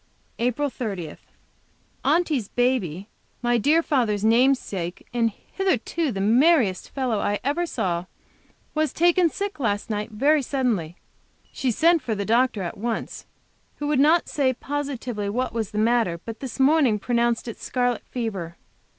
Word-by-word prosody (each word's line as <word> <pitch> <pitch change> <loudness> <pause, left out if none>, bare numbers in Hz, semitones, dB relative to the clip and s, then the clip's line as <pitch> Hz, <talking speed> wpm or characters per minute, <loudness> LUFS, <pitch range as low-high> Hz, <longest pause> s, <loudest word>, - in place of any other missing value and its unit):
APRIL 250 +4 0
30. 195 -11 -5 0.9
Aunty's 305 - +1
baby, 205 -8 0 0.4
my 240 0 +2
dear 310 +8 +3
father's 220 -9 +1
namesake, 220 -7 +1
and 235 -1 +2
hitherto 330 - -2
the 195 - -4
merriest 230 - +3
little - - -19
fellow 255 -6 0
I 205 +1 0
ever 310 +7 0
saw, 175 - -2 0.7
was 310 -1 0
taken 345 +1 +4
sick 400 0 -4
last 210 -3 -1
night, 210 0 -2
very 280 +8 +2
suddenly. 240 - -1 0.6
She 265 - -1
sent 325 +8 +3
for 225 - -2
the 200 0 -3
doctor 230 -2 +2
at 175 - -6
once, 230 +1 -4 0.5
who 295 - -5
would 295 -3 +2
not 315 +4 +4
say 265 -3 +1
positively 255 -6 -4
what 250 +5 -2
was 225 -3 -2
the 210 - -7
matter, 220 -6 +2
but 225 -1 -7
this 265 -1 -7
morning 270 -5 +4
pronounced 235 +1 0
it 230 - -7
scarlet 245 -2 0
fever. 195 -9 -4
240 Hz, 150 wpm, -24 LUFS, 210-285 Hz, 0.9 s, taken